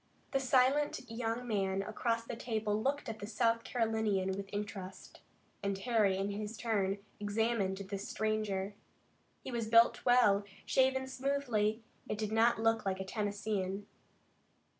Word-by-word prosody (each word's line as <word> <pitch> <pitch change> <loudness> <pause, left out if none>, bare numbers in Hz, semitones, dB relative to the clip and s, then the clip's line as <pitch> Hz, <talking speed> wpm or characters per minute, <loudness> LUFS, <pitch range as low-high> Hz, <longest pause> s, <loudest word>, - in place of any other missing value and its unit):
The 270 - +2
silent 270 +3 +3
young 230 +1 -2
man 195 -3 0
across 230 +2 -1
the 230 - -6
table 215 -2 -1
looked 280 +4 -1
at 220 -1 -5
the 205 - -6
South 230 +1 +1
Carolinian 220 -5 0
with 195 +1 -5
interest, 205 -2 -6 0.4
and 200 -1 -1
Harry 210 -3 +2
in 195 +1 -1
his 210 +2 -5
turn 205 -4 0 0.2
examined 205 -2 0
this 200 0 -5
stranger. 210 -2 -1 0.7
He - - -5
was 235 -2 -2
built 230 +1 +5
well, 240 -5 +5 0.2
shaven 265 0 +3
smoothly, 255 -5 0 0.3
and 210 - -1
did 215 0 -2
not 225 +1 +4
look 225 0 +2
like 190 -1 -1
a 190 - -3
Tennesseean. 205 -1 -2
215 Hz, 140 wpm, -34 LUFS, 200-235 Hz, 0.7 s, built